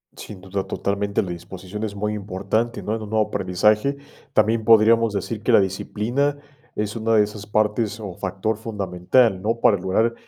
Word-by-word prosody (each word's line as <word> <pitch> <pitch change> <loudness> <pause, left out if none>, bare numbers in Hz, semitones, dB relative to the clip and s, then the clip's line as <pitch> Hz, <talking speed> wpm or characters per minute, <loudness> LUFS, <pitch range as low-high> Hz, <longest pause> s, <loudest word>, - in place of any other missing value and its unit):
Sin 100 -3 -10
duda, 95 +1 -4
totalmente, 100 0 -1
la 90 - -5
disposición 95 +4 -7
es 105 -2 -4
muy 105 +1 -2
importante, 105 +4 -2
¿no?, 110 - -1
en 115 - -5
un 105 - -7
nuevo 110 -1 +1
aprendizaje, 105 +9 +1 0.4
también 110 +1 +2
podríamos 115 0 +5
decir 100 +2 -3
que 120 - +1
la 115 - +7
disciplina 115 +9 -1 0.4
es 105 +1 -2
una 115 0 +1
de 105 - +6
esas 105 0 -7
partes 105 +1 0
o 100 -4 -6
factor 100 +3 -2
fundamental, 100 0 +1
¿no?, 115 +3 -1
para 100 - +4
lograr, 95 +6 +1
105 Hz, 175 wpm, -22 LUFS, 100-110 Hz, 0.4 s, la